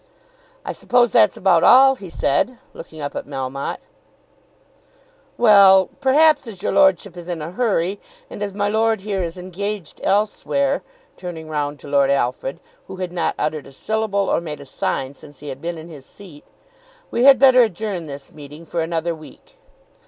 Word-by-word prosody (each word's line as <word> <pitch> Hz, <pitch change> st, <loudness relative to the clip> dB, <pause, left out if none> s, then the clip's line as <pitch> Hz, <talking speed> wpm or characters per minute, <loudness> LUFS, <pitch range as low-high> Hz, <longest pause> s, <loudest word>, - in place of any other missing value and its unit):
"I -, -, -4 dB
suppose 245 Hz, -2 st, +2 dB
that's 105 Hz, -, +4 dB
about 180 Hz, -3 st, +3 dB
all," 265 Hz, +1 st, +7 dB
he 195 Hz, -7 st, -10 dB
said, 165 Hz, -, 0 dB, 0.2 s
looking 160 Hz, -1 st, -11 dB
up 145 Hz, -, -5 dB
at -, -, -5 dB
Melmotte. 135 Hz, -1 st, -5 dB, 1.6 s
"Well; 200 Hz, -4 st, +6 dB
perhaps 290 Hz, +1 st, +4 dB
as 200 Hz, -4 st, -10 dB
your -, -, 0 dB
lordship 255 Hz, -, +3 dB
is 175 Hz, -1 st, -10 dB
in 175 Hz, -2 st, -4 dB
a 155 Hz, +2 st, -6 dB
hurry, 195 Hz, -3 st, -1 dB, 0.3 s
and -, -, -10 dB
as 205 Hz, -1 st, -2 dB
my 205 Hz, +1 st, -1 dB
lord 220 Hz, 0 st, +1 dB
here 200 Hz, -1 st, -3 dB
is 170 Hz, 0 st, -4 dB
engaged 185 Hz, 0 st, -6 dB
elsewhere," 245 Hz, +7 st, 0 dB, 0.4 s
turning 165 Hz, -3 st, -8 dB
round 145 Hz, -1 st, -3 dB
to -, -, -11 dB
Lord 140 Hz, -1 st, +2 dB
Alfred, 135 Hz, +2 st, -1 dB, 0.3 s
who 190 Hz, -, -8 dB
had 185 Hz, -1 st, -5 dB
not 175 Hz, -1 st, -1 dB
uttered 150 Hz, -1 st, -3 dB
a -, -, -13 dB
syllable 200 Hz, +4 st, -2 dB
or -, -, +1 dB
made 150 Hz, -3 st, -7 dB
a 140 Hz, -, -11 dB
sign 135 Hz, 0 st, -3 dB
since 145 Hz, 0 st, -16 dB
he 145 Hz, +1 st, -9 dB
had 135 Hz, 0 st, -8 dB
been 170 Hz, 0 st, -4 dB
in 160 Hz, +1 st, -10 dB
his 145 Hz, -5 st, -13 dB
seat, 170 Hz, -8 st, -15 dB, 0.7 s
"we 240 Hz, -, +1 dB
had 275 Hz, -1 st, +8 dB
better 260 Hz, -2 st, +6 dB
adjourn 205 Hz, -5 st, -2 dB
this 140 Hz, -1 st, -9 dB
meeting 150 Hz, +2 st, -12 dB
for 170 Hz, 0 st, -3 dB
another 165 Hz, +1 st, -2 dB
week." -, -, -15 dB
180 Hz, 175 wpm, -20 LUFS, 150-215 Hz, 1.6 s, had